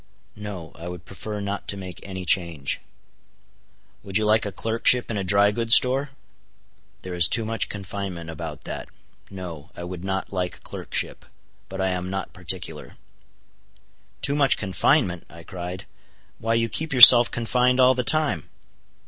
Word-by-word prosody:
"No; 100 -6 -8
I 85 - -10
would 90 -1 -8
prefer 105 +3 -7
not 100 0 -5
to 100 - -2
make 95 -2 -9
any 95 -2 -7
change." 85 -6 -1 1.2
"Would 100 0 -2
you 110 - 0
like 110 0 +2
a - - -5
clerkship 115 +3 +2
in 110 - -3
a 100 - -2
dry 100 +2 +3
goods 115 +2 +5
store?" 135 +3 +4 0.9
"There 95 - -7
is 85 -1 +5
too 115 -1 0
much 115 -1 -2
confinement 95 -4 -6
about 80 - -8
that. - - -7 0.4
No, 90 -6 -9
I 85 - -8
would 90 0 -7
not 95 0 -4
like 90 -1 -3
a - - -18
clerkship; - - -4 0.5
but 95 - -7
I 95 0 0
am 90 0 -3
not 95 +1 -5
particular." 90 0 -5 1.3
"Too 140 - +3
much 140 -2 +3
confinement," 95 - 0
I 85 0 -13
cried, 90 0 -8 0.5
"why 115 +1 -1
you 115 0 +1
keep 155 +7 -2
yourself 120 -1 +10
confined 125 +2 0
all 130 0 +6
the 125 0 -2
time!" 140 - +1
100 Hz, 160 wpm, -23 LUFS, 90-115 Hz, 1.3 s, yourself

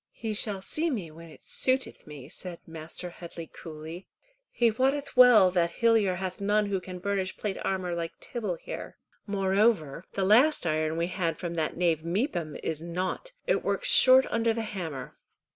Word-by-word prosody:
"He 220 -2 -4
shall 205 -2 -1
see 325 +9 -1
me 195 - -4
when 165 +1 -12
it 155 - -16
suiteth 260 -7 0
me," 145 -4 -10
said 180 -2 -7
Mr. 165 +2 -8
Headley 170 -1 -9
coolly. 160 +3 -10 0.4
"He 235 -1 +2
wotteth 270 +5 -1
well 240 -7 +7
that 170 -2 +1
Hillyer 225 -5 +3
hath 185 +1 -5
none 210 +1 +2
who 195 -2 -2
can 185 0 -8
burnish 190 0 -2
plate 205 -2 -3
armour 185 -2 -2
like 170 -1 -5
Tibble 215 -7 -4
here." - - -8 0.3
"Moreover 195 -5 +1
the 195 - 0
last 245 - +4
iron 155 0 0
we 170 - +1
had 170 -3 -2
from 170 -2 -4
that 160 -2 -2
knave 170 -3 +1
Mepham 170 - -2
is 160 -1 -3
nought. 185 - -4
It - - +1
works - - 0
short 260 0 +8
under 230 -1 +1
the 230 - -2
hammer." 170 -11 -6
185 Hz, 175 wpm, -28 LUFS, 170-220 Hz, 0.4 s, short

